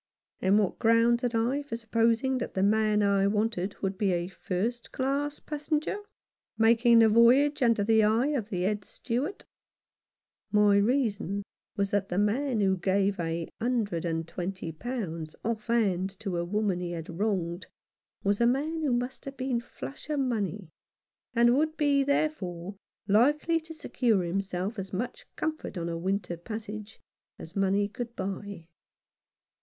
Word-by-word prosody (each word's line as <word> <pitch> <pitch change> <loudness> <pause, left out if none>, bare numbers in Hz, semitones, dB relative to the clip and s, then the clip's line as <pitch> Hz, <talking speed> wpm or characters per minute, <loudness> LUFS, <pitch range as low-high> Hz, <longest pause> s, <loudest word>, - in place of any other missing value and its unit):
And 190 +2 +4
what 205 -4 0
grounds 230 +1 +4
had 245 -2 -1
I 245 +6 +1
for 280 -5 -5
supposing 230 +3 +1
that 240 - -5
the 190 - +1
man 210 0 +3
I 200 -1 +3
wanted 205 -2 0
would 195 -1 -2
be 195 -3 +2
a 175 +1 -1
first 215 +6 -3
class 280 +2 -1
passenger, 305 +5 -2 0.6
making 230 +1 +5
the 225 -1 +7
voyage 250 +7 +5
under 230 -4 +3
the 220 +1 +4
eye 225 +6 +3
of 245 -8 -2
the 180 -3 -2
Head 205 +1 0
Steward? 260 - -4 1.1
My 210 -1 +5
reason 205 -3 +1 0.3
was 200 -1 0
that 200 -1 0
the 180 - -2
man 225 +4 +1
who 190 -1 +2
gave 195 +2 +1
a 165 0 -2
hundred 220 -8 0
and 165 -1 -2
twenty 180 -1 -4
pounds 165 -6 -5
off 225 -1 -2
hand 195 -6 +1
to 195 -5 -2
a 170 - 0
woman 205 -1 0
he 175 -1 -4
had 165 -1 -5
wronged 185 -4 -1 0.6
was 200 +2 +1
a 235 - +5
man 300 +6 0
who 285 -5 +1
must 245 +2 -3
have 275 0 -7
been 255 -2 -1
flush 275 +5 -9
of 300 -2 0
money, 210 - -2 0.6
and 240 +1 +5
would 310 +2 +1
be, 285 -2 +3
therefore, 200 - -1 0.3
likely 295 +10 +3
to 325 0 -13
secure 230 - +1
himself 195 +3 -2
as 190 0 -6
much 250 - -4
comfort 310 -10 -3
on 170 0 -2
a 170 - -3
winter 180 0 -2
passage 215 +3 -7 0.4
as 165 - -11
money 195 +1 +2
could 235 +3 -6
buy. 195 -2 -5
215 Hz, 160 wpm, -28 LUFS, 195-245 Hz, 1.1 s, the